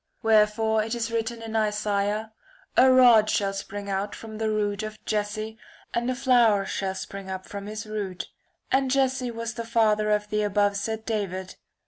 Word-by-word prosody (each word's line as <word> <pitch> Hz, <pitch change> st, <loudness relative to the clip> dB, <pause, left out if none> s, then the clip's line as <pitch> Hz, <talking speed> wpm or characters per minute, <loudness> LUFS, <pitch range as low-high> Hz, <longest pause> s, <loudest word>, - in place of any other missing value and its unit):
Wherefore 220 Hz, 0 st, +3 dB
it 225 Hz, +2 st, -3 dB
is 230 Hz, -1 st, -2 dB
written 230 Hz, 0 st, -2 dB
in 225 Hz, 0 st, -6 dB
Isaiah 210 Hz, 0 st, 0 dB, 0.2 s
' -, -, -30 dB
a 260 Hz, +1 st, +7 dB
rod 240 Hz, -4 st, +7 dB
shall 195 Hz, -1 st, +1 dB
spring 200 Hz, +1 st, -6 dB
out 200 Hz, +1 st, -2 dB
of 220 Hz, -1 st, -8 dB
the 220 Hz, -1 st, 0 dB
root 205 Hz, -1 st, -1 dB
of 215 Hz, 0 st, -6 dB
Jesse 215 Hz, +1 st, -2 dB, 0.3 s
and 240 Hz, +1 st, 0 dB
a 255 Hz, -, 0 dB
flower 240 Hz, -6 st, +4 dB
shall 190 Hz, -1 st, -3 dB
spring 195 Hz, 0 st, -7 dB
up 190 Hz, 0 st, -5 dB
from 200 Hz, 0 st, -7 dB
his 215 Hz, +1 st, -5 dB
root.' 205 Hz, -4 st, -4 dB, 0.4 s
And 265 Hz, 0 st, +2 dB
Jesse 260 Hz, -1 st, +1 dB
was 230 Hz, 0 st, -4 dB
the 230 Hz, -, -5 dB
father 215 Hz, -2 st, +2 dB
of 210 Hz, 0 st, 0 dB
the 210 Hz, 0 st, +1 dB
above 205 Hz, 0 st, +2 dB
said 220 Hz, +2 st, -3 dB
David. 190 Hz, -4 st, -3 dB
215 Hz, 180 wpm, -26 LUFS, 205-230 Hz, 0.4 s, a